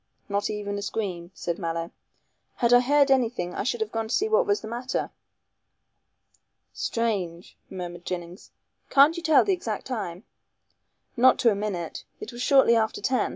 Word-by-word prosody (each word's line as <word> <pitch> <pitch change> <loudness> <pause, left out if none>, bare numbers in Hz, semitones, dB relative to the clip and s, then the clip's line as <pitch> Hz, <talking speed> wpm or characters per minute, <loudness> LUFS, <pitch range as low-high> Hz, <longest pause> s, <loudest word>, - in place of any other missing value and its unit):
"Not 200 0 -1
even 205 -1 -3
a - - -5
scream," 185 -5 -4
said 170 -1 -3
Mallow; 165 -1 -3 0.6
"had 240 -1 +2
I 245 - +8
heard 280 +2 +3
anything 235 -9 +1
I - - -3
should 240 0 -2
have 220 0 -2
gone 225 -1 -2
to 225 - 0
see 425 - +1
what 450 +3 +2
was 410 0 +1
the - - -7
matter." 245 +3 -3 1.6
"Strange!" 190 -7 -2
murmured 175 -2 -7
Jennings, 175 0 -6 0.4
"can't 285 +4 +6
you 340 - -4
tell 315 -3 +5
the 395 - +2
exact 230 - -4
time?" 210 -7 -5 0.9
"Not 255 +1 +5
to 230 - +4
a - - 0
minute. 195 -5 -4 0.2
It 215 - -7
was 240 0 -8
shortly 265 -3 +5
after 220 -1 0
ten. 260 -1 +1
225 Hz, 170 wpm, -26 LUFS, 185-260 Hz, 1.6 s, I